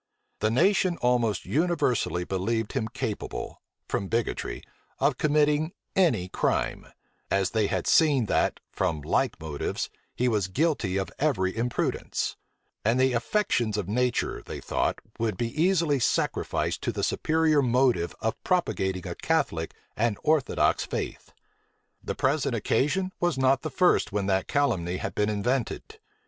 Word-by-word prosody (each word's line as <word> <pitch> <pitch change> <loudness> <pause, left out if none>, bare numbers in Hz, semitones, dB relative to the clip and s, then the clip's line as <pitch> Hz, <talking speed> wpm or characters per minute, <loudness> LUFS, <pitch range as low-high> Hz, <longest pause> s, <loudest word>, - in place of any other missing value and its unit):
The 110 - +2
nation 185 - +3
almost 120 -3 +1
universally 145 - +1
believed 105 +5 -1
him 115 -5 -1
capable, 115 -2 -5 0.3
from 95 - -2
bigotry, 115 +2 -2 0.3
of - - +1
committing 150 +2 +2 0.2
any 135 - +3
crime; - - -1 0.4
as 95 -1 +1
they 110 -2 +2
had 95 -3 -1
seen 145 -7 +4
that, - - +1
from 85 -5 -1
like - - 0
motives, 80 -2 -3 0.2
he 125 - +1
was 105 -6 +1
guilty 115 - 0
of 95 - -2
every 105 -11 +1
imprudence: 120 +2 -1 0.5
and 115 +4 +2
the 130 0 +3
affections 120 - 0
of 100 -4 -2
nature, 125 +3 0
they - - -7
thought, - - -1 0.2
would 110 -4 -1
be 115 +2 -1
easily 165 -6 +3
sacrificed - - 0
to - - -1
the - - -4
superior 155 -2 +2
motive 125 -7 +2
of 110 - -2
propagating 95 - 0
a - - -3
Catholic 80 0 -1 0.2
and 115 -2 +1
orthodox 155 -3 +2
faith. - - -5 0.7
The - - -3
present 135 -2 +1
occasion 150 - +1
was 175 -5 +1
not 130 0 +3
the 155 - -3
first 180 +6 +3
when 100 -1 -1
that 95 -1 +1
calumny 95 -11 0
had - - -4
been 105 0 +1
invented. 115 +4 -2
120 Hz, 140 wpm, -27 LUFS, 100-150 Hz, 0.7 s, seen